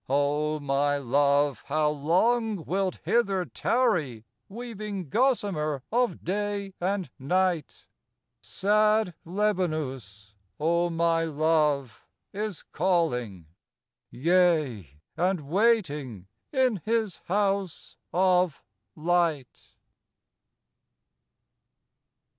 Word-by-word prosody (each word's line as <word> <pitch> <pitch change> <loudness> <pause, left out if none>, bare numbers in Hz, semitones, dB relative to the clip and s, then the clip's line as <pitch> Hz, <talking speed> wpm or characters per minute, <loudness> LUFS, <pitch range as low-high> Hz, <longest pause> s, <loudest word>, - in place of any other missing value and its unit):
O 145 +2 +1
my 145 0 +1
Love, 140 +1 +2
how 150 +1 +1
long 185 +7 +1
wilt 190 +1 -1
hither 195 -6 +1
tarry 175 - 0 0.2
Weaving 210 - -6
gossamer 195 - 0
of 245 +1 0
day 200 +1 -2
and 190 0 -1
night? 175 +3 -1 0.6
Sad 215 -1 +2
Lebanus, 155 - -2 0.3
O 170 +3 +1
my 165 0 +1
Love, 150 -5 0 0.3
is 210 -2 -4
calling, 125 - -1 0.6
Yea, 155 - +1 0.3
and 180 +1 0
waiting 150 - +1 0.3
in 260 -5 +2
his 220 -3 0
House 195 -2 -1
of 180 -3 +2 0.3
Light. 165 -5 -1
170 Hz, 80 wpm, -27 LUFS, 145-200 Hz, 0.6 s, Love